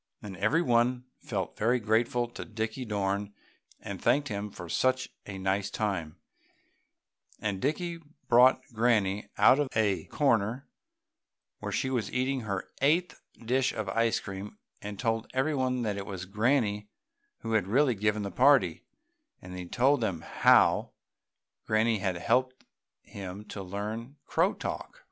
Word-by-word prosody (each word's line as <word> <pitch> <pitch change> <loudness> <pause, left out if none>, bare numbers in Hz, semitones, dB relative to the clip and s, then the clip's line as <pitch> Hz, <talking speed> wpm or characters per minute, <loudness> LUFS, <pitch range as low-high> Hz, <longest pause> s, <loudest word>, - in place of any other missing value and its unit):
And 100 -2 -8
every 130 - +2
one 125 -1 +2
felt - - -4
very 120 +4 +2
grateful 115 +2 +1
to - - -7
Dickie 110 +2 -4
Dorn 100 -1 -2 0.4
and - - -7
thanked 140 0 +2
him 105 0 -3
for 90 -3 -9
such 130 +7 +1 0.2
a 100 -2 -6
nice 95 +1 0
time, 95 -7 -3 1.2
and 100 -3 -2
Dickie 170 +4 -1 0.3
brought 125 +2 +6
Granny 110 -3 +1
out 135 - +6
of 145 -2 0
a 105 -3 +1
corner 120 -2 +1 0.9
where - - -5
she 130 - -1
was 120 -6 -1
eating 130 +1 0
her 100 -5 -4
eighth 165 +6 +2 0.2
dish 125 +2 +1
of 105 -3 -3
ice 115 +3 +1
cream 100 +1 -8 0.2
and 105 0 -6
told 115 0 -1
everybody 130 -3 0
that 105 -3 -1
it 100 - -5
was 95 -2 -5
Granny 105 0 0 0.5
who 115 - -4
had 105 -4 +2
really 130 +5 +3
given 105 0 0
the 100 - -4
party, 135 +8 +4 0.6
and 90 0 -10
he 90 -1 -6
told 130 +6 +2
them 95 -7 -1
how - - +4 0.7
Granny 110 0 +2
had 95 -2 -1
helped 130 +7 0 0.4
him 100 +1 -8
to 100 - -6
learn 105 +7 -5
crow - - +1
talk. - - -5
110 Hz, 145 wpm, -29 LUFS, 100-130 Hz, 1.2 s, brought